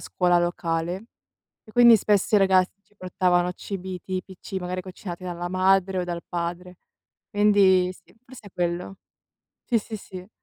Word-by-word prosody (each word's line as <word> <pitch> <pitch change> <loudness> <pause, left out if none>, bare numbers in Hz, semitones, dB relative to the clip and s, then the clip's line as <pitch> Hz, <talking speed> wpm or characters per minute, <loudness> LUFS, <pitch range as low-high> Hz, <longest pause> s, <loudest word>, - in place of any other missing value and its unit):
scuola 180 -1 +1
locale, 175 +2 -2 0.6
e 215 - -17
quindi 235 -1 +8
spesso 205 +1 +1
i - - +6
ragaz 190 -2 +4 0.2
ci 210 - -33
portavano 180 -1 +1
cibi 185 -1 -6
tipici, 190 0 -6
magari 180 0 -4
cucinati 185 -1 -8
dalla 175 -1 -4
madre 190 0 +2
o 180 - -1
dal 170 -1 -5
padre. 175 +1 -5 0.5
Quindi 195 -3 +4
sì, - - -22
forse 250 -4 -14
è - - -11
quello. 175 +2 -3 0.7
Sì, 235 - +2
sì, 215 +1 -7
sì. 185 -2 -10
185 Hz, 150 wpm, -24 LUFS, 175-195 Hz, 0.7 s, quindi